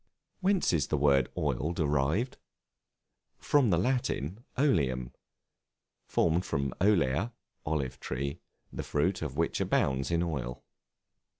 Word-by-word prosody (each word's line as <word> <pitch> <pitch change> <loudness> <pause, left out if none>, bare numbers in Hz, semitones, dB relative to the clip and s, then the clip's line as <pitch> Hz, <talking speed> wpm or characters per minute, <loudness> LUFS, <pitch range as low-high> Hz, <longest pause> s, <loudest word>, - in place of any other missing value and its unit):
Whence 195 - +2
is 75 -6 +1
the 75 - 0
word 70 -2 +3
Oil 80 +5 0
derived? 80 - 0 1.0
From 140 -6 +3
the 85 - +3
Latin 105 - -1
oleum, 65 - +1 1.0
formed 85 +2 +2
from 70 -5 -2
olea, 95 - +2 0.3
olive 75 -5 -1
tree, 70 +5 -3 0.3
the - - -3
fruit 90 +6 0
of 75 -3 -4
which 85 0 0
abounds 65 0 +1
in 85 0 +1
oil. 65 -8 -4
80 Hz, 115 wpm, -30 LUFS, 70-95 Hz, 1.0 s, word